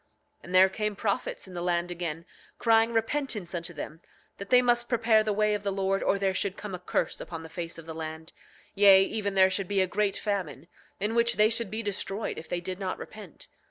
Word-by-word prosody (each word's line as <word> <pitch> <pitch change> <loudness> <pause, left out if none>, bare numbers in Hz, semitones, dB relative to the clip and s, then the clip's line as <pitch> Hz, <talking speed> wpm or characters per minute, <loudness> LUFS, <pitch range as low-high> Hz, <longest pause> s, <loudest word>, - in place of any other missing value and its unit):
9:28 - - -38
And 180 +1 -4
there 190 +1 +7
came 210 +1 -2
prophets 200 -1 -2
in 185 - -11
the 175 - -4
land 175 0 0
again, 170 -2 -4 0.3
crying 225 0 +3
repentance 225 -5 -2
unto 175 0 -4
them—that 175 +4 -10
they 250 - +7
must 240 -1 +2
prepare 225 -2 +3
the 215 - -1
way 210 +1 +2
of 210 - -2
the 200 -1 -2
Lord 195 0 0
or 200 - +2
there 195 -1 0
should 190 0 -1
come 210 -2 -7
a 180 - -4
curse 180 - -2
upon 165 -1 -7
the 160 - -10
face 170 0 -6
of 165 - -10
the 160 - -7
land; 160 0 -7 0.4
yea, 195 -1 +7
even 200 -1 -2
there 190 0 +5
should 195 -1 -1
be 200 0 0
a 190 - +4
great 200 +1 0
famine, 180 -8 -3 0.3
in 210 +3 0
which 235 0 +3
they 215 +1 +4
should 230 0 -1
be 220 +1 -3
destroyed 205 +1 -3
if 160 - -12
they 175 - -2
did 185 +1 -5
not 190 -2 -3
repent. 210 -6 -11
195 Hz, 230 wpm, -28 LUFS, 175-215 Hz, 0.4 s, there